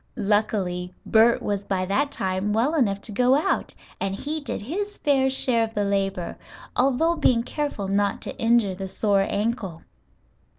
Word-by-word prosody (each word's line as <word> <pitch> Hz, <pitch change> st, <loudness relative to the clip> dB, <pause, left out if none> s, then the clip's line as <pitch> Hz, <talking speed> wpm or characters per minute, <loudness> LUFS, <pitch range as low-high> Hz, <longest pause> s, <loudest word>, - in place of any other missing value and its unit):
Luckily, 190 Hz, -4 st, 0 dB
Bert 230 Hz, +2 st, +4 dB
was 205 Hz, -1 st, -2 dB
by 190 Hz, -2 st, -1 dB
that 265 Hz, +10 st, +1 dB
time 190 Hz, -2 st, -1 dB
well 240 Hz, +8 st, +2 dB
enough 205 Hz, -10 st, +1 dB
to 220 Hz, -, -7 dB
go 250 Hz, +5 st, +3 dB
out 295 Hz, -, 0 dB, 0.2 s
and 195 Hz, 0 st, -2 dB
he 300 Hz, +9 st, -4 dB
did 285 Hz, -7 st, -5 dB
his 405 Hz, -, -4 dB
fair 270 Hz, -2 st, +2 dB
share 255 Hz, -3 st, +3 dB
of 225 Hz, 0 st, -5 dB
the 205 Hz, -, +1 dB
labor, 195 Hz, -3 st, -2 dB, 0.4 s
although 275 Hz, +6 st, +2 dB
being 250 Hz, -7 st, +2 dB
careful 285 Hz, -7 st, -3 dB
not 200 Hz, 0 st, 0 dB
to -, -, -5 dB
injure 230 Hz, -4 st, +3 dB
the 190 Hz, +1 st, -5 dB
sore 200 Hz, 0 st, +1 dB
ankle. 205 Hz, -5 st, -2 dB
215 Hz, 165 wpm, -24 LUFS, 195-265 Hz, 0.4 s, Bert